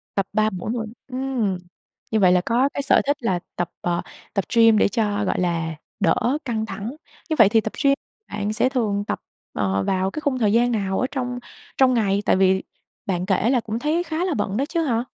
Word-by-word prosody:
Tập 195 - +1
3 215 +1 +3
buổi 185 0 -5
mỗi 230 -2 -3 0.2
ừm, 255 -7 -1 0.5
như 220 - +2
vậy 185 -3 +5
là 180 0 +4
có 245 +4 +2
cái - - -2
sở 275 - +4
thích 285 0 +2
là 185 -6 +1 0.2
tập, 175 - -2
ờ, 175 -1 0 0.3
tập 195 -3 0
gym 225 -1 +6
để - - +4
cho, 205 -1 0
gọi - - 0
là, 165 -3 -1 0.2
đỡ 240 +6 +2
căng 225 -4 -1
thẳng. 220 +4 -6 0.3
Như 315 - +1
vậy 215 -3 +8
thì 225 +1 +4
tập 220 - -5
gym 275 -1 +5 0.4
bạn 205 0 -2
sẽ 255 - +2
thường 215 -6 0
tập, - - -2 0.3
ờ, 95 -1 0
vào 190 - 0
cái 305 - -5
khung 280 -3 0
thời 210 -3 +2
gian 240 +1 +3
nào 195 -4 0
ở 255 - +1
trong 250 -3 -3 0.4
trong 260 -1 +5
ngày? 200 -4 +2
Tại - - +4
vì 190 0 +3 0.4
bạn 180 -4 -1
kể 195 +3 +2
là 255 -1 +3
cũng 225 0 -4
thấy 310 +6 0
khá 330 +1 -2
là 365 - 0
bận 205 -3 -1
đó 275 - +1
chứ 335 -1 0
hả? 235 -6 0
220 Hz, 225 wpm, -23 LUFS, 195-255 Hz, 0.5 s, vậy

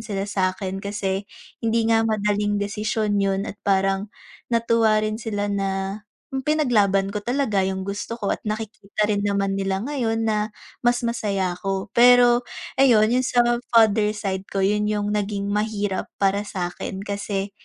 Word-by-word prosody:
sila 200 -3 -3
sakin 190 -1 -2
kasi, 200 -1 -3 0.3
hindi 230 0 +1
nga 225 0 +4
madaling 205 -1 0
desisyon 210 0 -1
yun 195 0 0
at 205 - -8
parang, 195 +1 +1 0.4
natuwa 230 -2 +3
rin 215 +2 -3
sila 205 -2 -2
na, 195 0 -2 0.3
yung 265 - -1
pinaglaban 210 -10 +2
ko 210 - -3
talaga 240 -5 0
yung 190 0 -2
gusto 205 +4 -4
ko 205 - 0
at - - -13
nakikita 210 -1 -3
rin 205 -1 0
naman 200 -1 0
nila 195 -1 -1
ngayon, 225 -6 -1
na 215 0 0 0.3
mas 240 0 +2
masaya 195 -6 -1
ako. 195 +1 -4
Pero 245 0 +6 0.3
ayun, 235 -6 +5
'yun 250 +3 +2
sa 250 -1 -1 0.3
father 215 -2 +4
side 195 -3 -3
ko 195 - -3
yun 210 +2 +1
yung 205 0 -1
naging 200 -1 -2
mahirap 210 -2 -2
para 200 +1 +2
sakin 190 0 -5
kasi 200 -1 -3
205 Hz, 155 wpm, -23 LUFS, 195-225 Hz, 0.4 s, Pero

